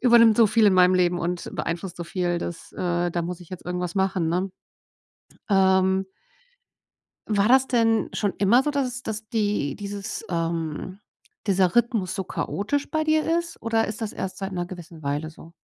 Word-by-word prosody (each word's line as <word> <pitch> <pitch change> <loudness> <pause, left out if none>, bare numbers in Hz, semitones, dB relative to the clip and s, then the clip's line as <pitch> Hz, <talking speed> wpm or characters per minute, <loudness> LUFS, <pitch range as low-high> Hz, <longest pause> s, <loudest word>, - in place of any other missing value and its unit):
übernimmt 235 -3 +6
so 230 -2 +6
viel 215 +1 +4
in 195 - +5
meinem 180 0 +6
Leben 180 -1 +2
und 175 0 -3
beeinflusst 175 +2 -4
so 175 - -5
viel, 175 0 -1
dass 170 -1 -6
äh, 175 0 -1
da 170 0 -1
muss 180 +1 -5
ich 175 - -13
jetzt 185 - -9
irgendwas 180 -1 -3
machen“, 190 -4 +1
ne. 185 +3 0 1.0
Ähm 190 -1 +3 1.2
war 210 0 +2
das 265 +1 +5
denn 225 -3 +2
schon 205 -2 -1
immer 220 +6 +5
so, 295 - 0
dass 280 -2 0
es 250 0 -6
dass 220 -2 -5
die 205 - 0
dieses, 205 +2 -5
ähm 165 +2 -3 0.5
dieser 190 -1 +2
Rhythmus 225 -6 +2
so 190 - -3
chaotisch 220 +10 -2
bei 315 -1 0
dir 310 0 +3 0.2
ist? 340 -1 -6
Oder 225 -1 +1
ist 215 +2 -5
das 220 -1 -3
erst 185 0 -5
seit 195 0 -4
'ner 175 -1 -2
gewissen 170 -3 -10
Weile 145 +2 -2
so? 160 +1 -15
190 Hz, 185 wpm, -24 LUFS, 175-225 Hz, 1.2 s, übernimmt